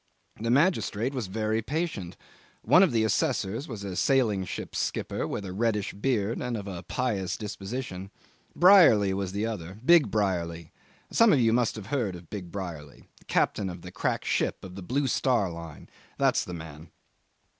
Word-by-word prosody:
The 115 +2 -2
magistrate 130 - +2
was 125 -7 -3
very 110 +3 -1
patient. 140 - -3 0.5
One 180 - +6
of 190 - +4
the 115 -2 +2
assessors 110 0 0
was 110 -6 -7
a 95 -2 -5
sailing 110 -4 +2
ship - - -6
skipper - - -2
with 100 - -4
a 90 - -6
reddish 105 -1 0
beard, 110 0 -1
and 125 -2 -2
of 100 -1 -7
a 90 -3 -6
pious 100 -3 -2
disposition. 100 -2 -6 0.5
Brierly 165 - +6
was 95 -1 -2
the 100 +3 -2
other. 95 -4 -5
Big 170 -1 +6
Brierly. 85 -6 -1 0.4
Some 230 -1 +5
of 145 - +4
you 115 -2 +3
must 120 -1 +1
have 110 -3 -7
heard 115 -10 0
of 85 -2 -13
Big 90 -5 -6
Brierly 85 -7 -8
the - - -24
captain 100 -2 0
of 90 -1 -9
the 90 - -8
crack - - -2
ship - - -1
of 95 - -9
the 95 - -8
Blue 135 +10 -1
Star 120 -6 +1
line. 85 -2 -9 0.3
That's - - +2
the 90 - -6
man. 80 -1 -10
105 Hz, 175 wpm, -27 LUFS, 95-125 Hz, 0.5 s, One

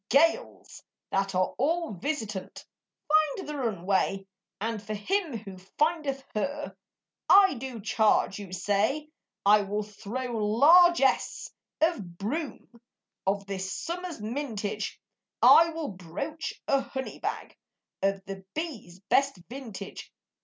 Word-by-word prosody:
Gales, 330 - +2 0.3
that 195 0 0
are 185 0 +1
all 325 +1 +1
visitant, 205 - -4 0.4
Find 310 +2 +2
the 300 - -4
runaway; 195 -5 0 0.3
And 220 0 -2
for 215 +1 -5
him 330 - -1
who 195 -3 -10 0.2
findeth 300 -4 +1
her 285 +7 -3 0.5
(I 390 -1 +8
do 255 -2 -6
charge 215 -1 +2
you 200 -3 -8
say) 205 - 0 0.4
I 210 +1 +7
will 205 +1 -2
throw 230 +4 -5
largesse 290 +7 +5 0.3
of 205 - 0
broom 245 - -5 0.5
Of 200 +1 +1
this 190 -1 -4
summer's 350 -2 -4
mintage, 215 -3 -3 0.4
I 335 +1 +8
will 320 -2 -4
broach 195 - -5
a 275 -1 +3
honey 265 -1 -6
bag - - -4 0.5
Of 195 0 0
the 195 0 -7
bee's 235 - -5
best 275 +7 +2
vintage. 225 -7 -8
230 Hz, 115 wpm, -28 LUFS, 200-300 Hz, 0.5 s, I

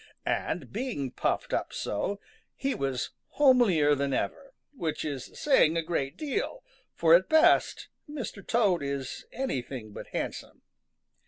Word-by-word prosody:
And 145 -8 -2
being 210 - -3
puffed - - -1
up - - -1
so, 195 - -2 0.4
he 275 0 -1
was 135 -2 -2 0.3
homelier 235 - +5
than 140 -1 0
ever, - - -3 0.2
which 165 - -3
is 140 -4 -4
saying 170 - +4
a 165 - 0
great 155 -5 -2
deal, 310 - -3 0.3
for 165 -1 +5
at 180 +2 +5
best 320 +3 +4 0.2
Mr. 255 -9 -6
Toad 205 -8 +2
is 135 -2 -4
anything 130 - -4
but - - -8
handsome. - - -5
170 Hz, 135 wpm, -29 LUFS, -, 0.4 s, homelier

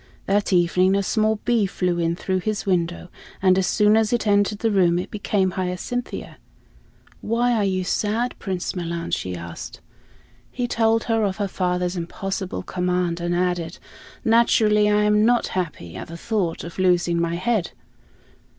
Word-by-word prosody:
That 200 +1 +1
evening 180 +1 +3
a 200 - +1
small 215 +2 +1
bee 230 -4 +2
flew 180 -2 -1
in 165 0 0
through 185 +1 -1
his 215 +2 -3
window, 175 -2 -1 0.3
and 185 -1 +4
as 190 -1 +1
soon 210 0 +4
as 220 -1 +2
it 240 -2 0
entered 205 0 +2
the 225 +1 0
room 175 -4 +3
it 180 - -4
became 200 -2 0
Hyacinthia. 185 +7 -4 0.8
"Why 240 +2 +1
are 220 -3 +1
you 185 -1 0
sad, 220 +6 -1
Prince 185 -1 -3
Milan?" 170 -1 -4
she 90 -1 -2
asked. 85 -1 -8 0.7
He 245 -1 -2
told 225 -1 +2
her 225 -2 +1
of 195 -2 -1
her 205 -1 -1
father's 180 -1 -1
impossible 185 - -4
command 180 -1 -1
and 175 0 -1
added, 175 -2 -1 0.5
"Naturally, 220 -2 +4
I 210 0 +3
am 210 0 +3
not 240 +1 +3
happy 150 - -4
at - - -7
the 165 - -8
thought 190 -3 -2
of 170 +2 -8
losing 175 -2 +2
my 170 0 -1
head." 210 0 0
190 Hz, 165 wpm, -23 LUFS, 175-215 Hz, 0.8 s, and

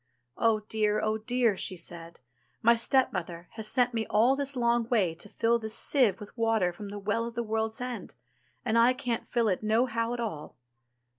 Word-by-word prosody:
"Oh 225 -2 +2
dear! 210 0 0
oh 215 0 0
dear!" 235 -1 +1
she 185 0 -2
said, 170 -1 -7 0.4
my 235 +1 +6
stepmother 180 -8 0
has 220 -2 -6
sent 245 +1 +2
me 225 -1 -2
all 235 +6 +4
this 280 0 -2
long 235 -1 +1
way 200 -9 +2
to 175 +5 -6
fill 230 +3 +1
this 220 0 -4
sieve 250 -9 +2
with 210 - -11
water 225 -6 +1
from 200 +3 -8
the 205 - -6
Well 215 +3 -1
of 235 - -8
the 235 - -1
World's 220 0 -1
End, 245 -4 -6 0.5
and 230 -1 +2
I 240 +2 +5
can't 250 -3 -3
fill 235 -2 +1
it 185 -3 0
no 220 +3 +2
how 230 -1 -2
at - - -7
all." 180 -11 -5
225 Hz, 200 wpm, -29 LUFS, 210-235 Hz, 0.5 s, my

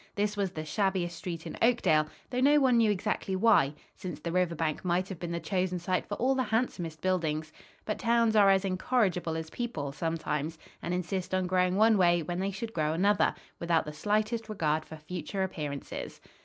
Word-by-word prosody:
This 205 0 0
was 200 -2 0
the 155 -3 -6
shabbiest 185 0 0
street 170 -2 -6
in - - -6
Oakdale, 185 -11 +3 0.2
though 250 - -1
no 290 +3 +5
one 260 -3 +4
knew 225 -2 +4
exactly 200 -1 -1
why, 190 -9 +4 0.2
since 175 -5 -7
the 170 +2 -4
river 180 -1 +1
bank 155 -1 -2
might 180 +1 +1
have 190 -4 -6
been 175 -1 -4
the 170 0 -2
chosen 185 0 -1
site 180 +1 -1
for 205 - -3
all 255 +5 +2
the 265 - 0
handsomest 180 -10 -2
buildings; 160 -4 -1 0.3
but 215 - -2
towns 230 -1 +3
are 205 -2 +6
as 195 0 +3
incorrigible 185 -4 0
as 160 0 -6
people, 160 - -3
sometimes, 160 0 -2 0.2
and 175 +1 -2
insist 180 +1 -2
on 185 0 +1
growing 180 0 +2
one 215 0 +5
way 175 -2 +4
when 175 +2 -3
they 195 +1 0
should 225 +3 -5
grow 155 -1 0
another, 200 +5 +2 0.2
without 170 -2 +1
the 150 - -6
slightest 215 +7 -1
regard 155 -6 0
for 160 - -9
future 180 +5 -4
appearances. 150 -6 -5
185 Hz, 195 wpm, -29 LUFS, 165-210 Hz, 0.3 s, are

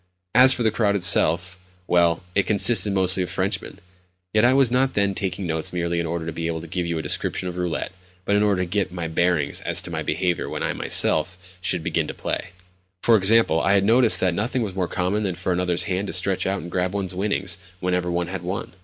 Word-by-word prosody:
As 130 +3 +7
for 120 - 0
the 110 - +2
crowd 105 -3 +1
itself—well, 90 -1 +1
it 100 0 +1
consisted 105 -1 +4
mostly 95 -1 +1
of 90 - -3
Frenchmen. - - -2 0.6
Yet 110 0 +3
I 120 - +5
was 135 -2 +3
not 130 +1 +1
then 100 -1 +1
taking 95 0 -4
notes 80 -1 -2
merely 85 -1 -2
in 85 - -2
order 85 0 -3
to 85 - -4
be 85 +1 -4
able 80 -1 -3
to - - -9
give 90 +1 -3
you 85 -1 -2
a 80 - -4
description 90 - -1
of 90 - -5
roulette, 90 -2 -3 0.3
but 100 - +1
in 105 - +3
order 100 -3 +1
to - - -2
get 95 +1 -2
my 85 -2 -4
bearings 80 -3 0
as - - +1
to - - -7
my - - -3
behaviour 90 +2 -1
when - - -4
I - - -1
myself 85 +3 +2 0.2
should 90 -2 -1
begin - - -1
to - - -7
play. - - -4 0.5
For 115 - +5
example, 100 -5 +3
I 100 0 +3
noticed 115 +4 +3
that 90 -2 +2
nothing 120 +6 -1
was 100 -4 -4
more 95 -2 -2
common 95 +4 -1
than 95 -4 -2
for 90 +1 -2
another's 90 -1 -1
hand 95 0 -2
to - - -4
stretch 95 +2 0
out 95 -3 -2
and 85 - -9
grab 90 +1 -1
one's 95 -2 -2
winnings 95 -2 -1 0.2
whenever 90 -1 -1
one 85 0 -1
had 95 0 -5
won. 90 +2 -5
90 Hz, 230 wpm, -23 LUFS, 85-100 Hz, 0.6 s, As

